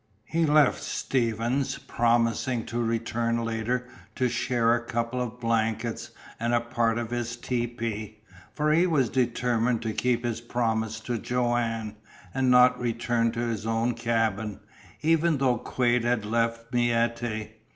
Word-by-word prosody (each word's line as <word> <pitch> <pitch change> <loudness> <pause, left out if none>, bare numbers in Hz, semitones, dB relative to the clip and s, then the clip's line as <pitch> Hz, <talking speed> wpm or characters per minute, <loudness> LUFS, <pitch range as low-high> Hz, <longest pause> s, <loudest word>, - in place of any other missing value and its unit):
He 165 +4 +1
left 150 -1 +4
Stevens, 120 +2 -1
promising 115 +1 +1
to 120 +2 -2
return 115 0 -1
later 115 +2 -1 0.3
to 125 -1 +1
share 120 -1 +2
a 120 -1 0
couple 120 +1 -2
of 125 0 -5
blankets 115 0 -1 0.3
and 115 +1 +1
a - - +4
part 115 -1 0
of 120 -1 -3
his 120 -1 -2
tepee, 115 -3 -3 0.3
for 150 0 +1
he 170 +3 +4
was 140 -8 +2
determined 120 -2 +1
to 110 -1 -2
keep 120 +2 0
his 115 -1 -2
promise 115 -2 -1
to 120 0 -3
Joanne, 115 -3 -1 0.4
and 130 -1 +1
not 125 0 +6
return 115 -1 0
to 120 - -2
his 115 -2 -2
own 115 +2 +1
cabin, 115 -3 -1 0.4
even 165 0 +3
though 130 -3 +2
Quade 120 -2 +1
had 120 -3 0
left 115 +2 -1
Miette. 115 -2 0
120 Hz, 140 wpm, -27 LUFS, 115-125 Hz, 0.4 s, not